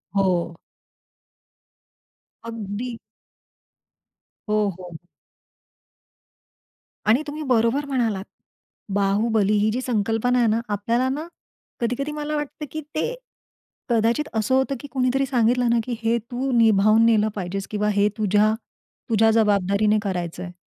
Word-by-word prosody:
हो. 180 -3 +1 1.9
अगदी. 230 +1 -5 1.5
हो, 210 -1 +2
हो, 185 - -9
हो. 170 +1 -12 2.0
आणि 225 +7 +4
तुम्ही 300 +1 -5
बरोबर 240 +5 +2
म्हणालात. 230 -8 -1 0.7
बाहुबली 205 +1 +2
ही 210 +1 +2
जी 250 - -2
संकल्पना 230 +1 0
आहे 235 - +3
ना, 220 +2 +2
आपल्याला 230 +5 0
ना 300 +5 -3 0.5
कधी-कधी 250 +5 -2
मला 300 0 -3
वाटतं, 295 +1 -4
की 310 - -4
ते 470 +10 -1 0.8
कदाचित 235 +5 +1
असं 220 +4 +1
होतं 265 +1 +1
की 285 - -9
कोणीतरी 260 +1 +1
सांगितलं 245 -1 +2
ना 235 0 +3
की 245 0 -4
हे 230 +1 +2
तू 260 +2 -2
निभावून 220 -1 +5
नेलं 220 -2 +4
पाहिजेस 195 +1 -4
किंवा 210 0 0
हे 205 0 +3
तुझ्या, 210 0 +3 0.6
तुझ्या 225 0 +4
जबाबदारीने 210 -1 +2
करायचंय. 180 -2 -4
225 Hz, 120 wpm, -23 LUFS, 205-250 Hz, 2.0 s, निभावून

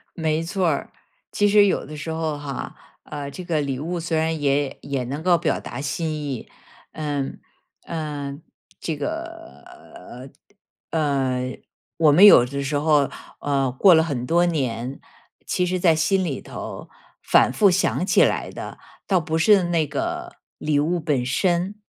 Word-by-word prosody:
没 160 -1 0
错 180 +1 0
儿。 140 - -2 0.4
其 205 0 +2
实 205 0 +6
有 - - 0
的 150 +1 -8
时 160 +2 -5
候 160 -2 -2
哈， 140 -2 -6 0.3
呃， 145 -2 -6
这 180 +5 -8
个 160 -3 0
礼 135 -2 -2
物 170 +4 -3
虽 165 -1 -2
然 160 0 0
也 140 -1 0
也 135 -3 -3
能 140 +5 -5
够 175 -1 +4
表 - - -1
达 - - -7
心 155 +3 -2
意， 145 -5 -5 0.4
嗯， 145 -3 -4 0.4
呃， 145 -4 -5 0.4
这 160 -3 -3
个 330 - -6 1.3
呃， 165 - -1
呃， 130 -4 -1 0.4
我 155 -3 +5
们 180 +7 +7
有 160 -12 +9
的 140 +2 -4
时 145 +2 -2
候， 150 -2 +3 0.3
呃， 135 -3 0
过 175 +8 +5
了 160 - +5
很 140 -7 -3
多 175 +4 +3
年， 130 -5 -2 0.5
其 180 - 0
实 185 +1 -1
在 170 -3 +4
心 190 +4 +1
里 140 -6 -3
头 - - -8 0.3
反 - - +4
复 200 +7 +4
想 175 0 +1
起 - - +5
来 - - -1
的， - - -8 0.3
倒 185 -3 +2
不 160 0 -2
是 195 +3 +5
那 170 -3 +1
个 - - -4 0.2
礼 150 -1 0
物 170 +4 0
本 145 -6 0
身， 180 +8 0
155 Hz, 175 characters per minute, -23 LUFS, 140-175 Hz, 1.3 s, 有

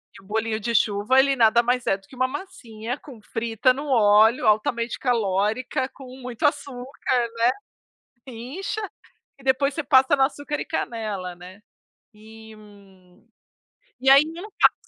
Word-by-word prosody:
e - - -14
o - - -22
bolinho 220 +1 -1
de 235 +2 -3
chuva 210 +5 +2
ele 275 0 +3
nada 235 -1 +4
mais 245 +1 0
é 195 - +2
do 195 0 -24
que 260 - -15
uma 255 +1 +1
massinha 255 - -7
com 265 -7 -13
frita 225 +3 0
no 285 +3 -6
óleo, 220 -1 +4
altamente 230 +2 +1
calórica, 235 +3 0
com 270 - -13 0.2
muito 245 0 -7
açúcar, 275 -3 -1 0.2
né. 230 - +2 0.8
Incha 260 - -6 0.6
e 270 - -17
depois 270 +2 +2
você 320 - -2
passa 265 -1 +4
no 265 - +4
açúcar 290 +2 -2
e - - -4
canela, 210 - -4
né. 180 +3 -13 0.5
E, 220 +1 -14
hum, 200 -2 -19 0.7
e 265 +1 +3
aí, 275 +1 +8
eu 350 - -7
não 425 - -10
faço. - - +3
235 Hz, 160 wpm, -23 LUFS, 215-265 Hz, 0.8 s, aí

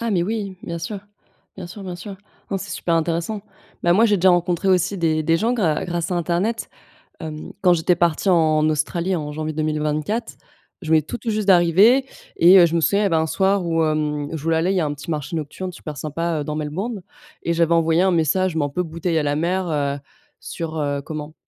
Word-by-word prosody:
Ah 230 0 -2
mais 180 -4 +2
oui, 200 -1 -3
bien 170 0 -5
sûr, 195 +5 -5 0.6
bien 190 -2 -7
sûr, 195 +3 -10
bien 180 -2 -6
sûr. 195 +3 -8 0.3
Non, 195 - 0
c'est - - -8
super 170 - -1
intéressant. 170 +5 -1 0.4
Bah 175 - +4
moi 210 +6 +4
j'ai 210 -2 +3
déjà 185 0 +4
rencontré 175 +1 +1
aussi 185 +1 +2
des 160 -2 +1
des 165 +2 +2
gens 225 +7 0
grâ 180 -11 0
grâce 175 -1 -3
à - - 0
internet, 175 +7 -1 0.5
hem, 155 -2 -7
quand 180 -2 +5
j'étais 175 +1 +2
partie 170 +2 +1
en 155 -3 +3
Australie 170 +4 -1
en 150 -3 -4
janvier 155 +1 -4
2024, 155 +7 -2 0.4
je 160 - -7
venais 160 -1 +5
tout 155 - -6
tout 240 - -5
juste 215 -1 -2
d'arriver 195 +8 +5 0.3
et 180 +3 +7
heu, 175 - +8
je 165 - -3
me 165 - +2
souviens 200 +5 +2
il - - +2
y - - +2
avait 180 -5 +1
un 160 0 +1
soir 190 +3 +1
où, 165 -1 +1
hem, 150 -2 -1
je 160 -3 -5
voulais 165 0 +1
aller 170 +4 +1
il - - 0
y - - +2
a - - 0
un 145 - -2
petit 145 +3 -10
marché 155 +1 -3
nocturne 165 +4 -5
super 150 -3 -8
sympa, 160 +1 -2
heu, - - -3
dans 150 +1 -4
Melbourne 185 +9 -4 0.4
et 170 - 0
j'avais 170 0 +2
envoyé 165 0 +3
un 190 0 +3
message 170 +2 +1
mais 155 -3 +1
un - - -3
peu 180 +6 -2
bouteille 165 0 -2
à 155 - +1
la 145 0 0
mer, 180 +4 -1
heu, 140 -2 -1 0.4
sur 160 -1 -6
heu, 145 -1 -1
comment? 155 +1 -7
170 Hz, 235 wpm, -21 LUFS, 155-185 Hz, 0.6 s, heu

